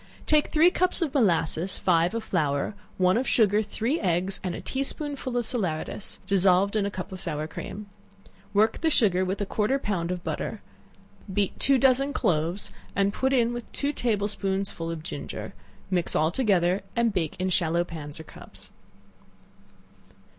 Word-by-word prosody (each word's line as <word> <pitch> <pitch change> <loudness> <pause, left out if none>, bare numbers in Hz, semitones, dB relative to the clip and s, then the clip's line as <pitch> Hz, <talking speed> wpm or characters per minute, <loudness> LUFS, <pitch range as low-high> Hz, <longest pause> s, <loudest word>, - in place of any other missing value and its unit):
Take 305 -1 +3
three 330 +3 +5
cups 365 -1 +1
of 300 - -2
molasses, 180 - +2
five 175 +2 +2
of 230 - -2
flour, 150 -3 0 0.2
one 185 +1 +3
of 260 - -1
sugar, 210 -2 +4
three 225 +7 -1
eggs, 185 +1 +1
and 180 -2 -2
a - - -5
tea 265 - -3
spoonful 275 -3 -3
of 240 - 0
salaeratus, 195 - -2
dissolved 195 +1 +3
in 205 -2 +1
a - - -1
cup 185 -2 -6
of 185 -1 -7
sour 150 -4 -3
cream; 200 +6 -7 0.7
work 215 +2 +2
the 325 - +3
sugar 195 - +3
with 190 +2 -2
a - - +1
quarter 210 +6 0
of 275 - -2
a - - -25
pound 175 -5 -1
of 180 -1 -3
butter; - - -4 0.7
beat 200 0 -1
two 275 -1 +4
dozen 270 +2 +3
cloves, 170 +3 0 0.2
and 200 0 +2
put 265 +3 0
in 240 -3 +2
with 240 -1 -7
two 285 +1 -1
table 215 -6 0
spoonsful 195 -4 -2
of 165 -2 -5
ginger; - - -6 0.4
mix 180 -2 +1
all 155 +1 +3
together, 190 -4 +2
and 235 -2 +2
bake 165 -5 -1
in 185 0 -1
shallow 170 -2 +2
pans 155 -3 -7
or - - -7
cups. - - -13
195 Hz, 175 wpm, -26 LUFS, 175-240 Hz, 0.7 s, three